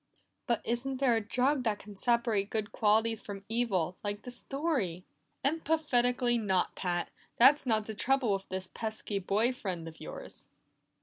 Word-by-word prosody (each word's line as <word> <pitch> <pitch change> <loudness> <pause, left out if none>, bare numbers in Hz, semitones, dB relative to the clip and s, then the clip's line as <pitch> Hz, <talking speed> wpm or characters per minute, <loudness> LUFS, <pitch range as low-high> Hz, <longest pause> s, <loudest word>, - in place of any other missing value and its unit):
"But 235 -3 +1
isn't 250 +3 0
there 255 -3 +3
a 225 - +1
drug 255 +6 +1
that 215 -2 +1
can 205 0 -11
separate 230 -2 +1
good 215 0 -2
qualities 220 0 +2
from 200 -1 -8
evil, 195 -7 0
like 205 0 -3
the 250 - -5
story?" 245 - -2 0.4
"Emphatically 255 -6 +2
not, 190 -4 +1
Pat! 175 -2 -2 0.3
That's 275 +3 +6
not 220 -2 +2
the 220 - -5
trouble 250 0 +2
with 195 0 -4
this 185 0 -3
pesky 220 -2 -3
boy 210 +6 +2
friend 180 -9 -4
of 160 0 -11
yours." - - -6
225 Hz, 160 wpm, -31 LUFS, 200-250 Hz, 0.4 s, That's